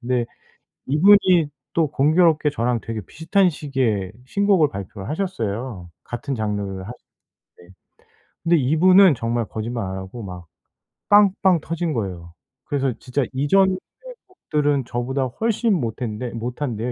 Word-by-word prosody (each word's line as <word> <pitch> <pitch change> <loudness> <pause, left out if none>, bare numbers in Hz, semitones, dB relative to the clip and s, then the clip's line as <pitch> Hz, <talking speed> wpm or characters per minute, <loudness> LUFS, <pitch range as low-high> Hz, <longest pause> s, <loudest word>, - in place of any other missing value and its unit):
근데 125 -1 0 0.6
이분이 175 +1 +5 0.2
또 165 -2 +1
공교롭게 155 +2 +3
저랑 120 -3 -1
되게 115 -1 -5
비슷한 180 - +1
시기에 130 - -1 0.2
신곡을 195 0 +3
발표를 95 0 -7
하셨어요. 115 - -4 0.2
같은 120 +3 -4
장르를 105 -3 -2 0.7
하셨는데 90 +2 -21 0.7
근데 170 0 +4
이분은 170 +5 +5
정말 115 -1 -1
거짓말 115 +1 -4
안 95 0 -5
하고 95 +5 -8
막 90 -2 -8 0.6
빵빵 195 -4 +4
터진 165 0 -3
거예요. 90 -7 -5 0.3
그래서 140 -3 0
진짜 130 +2 -2
이전의 185 +8 +3 0.5
곡들은 145 - -1
저보다 125 +3 -2
훨씬 225 - 0
못했는데 120 - -3
못한데요 120 0 -3
130 Hz, 300 characters per minute, -22 LUFS, 115-165 Hz, 0.7 s, 이분이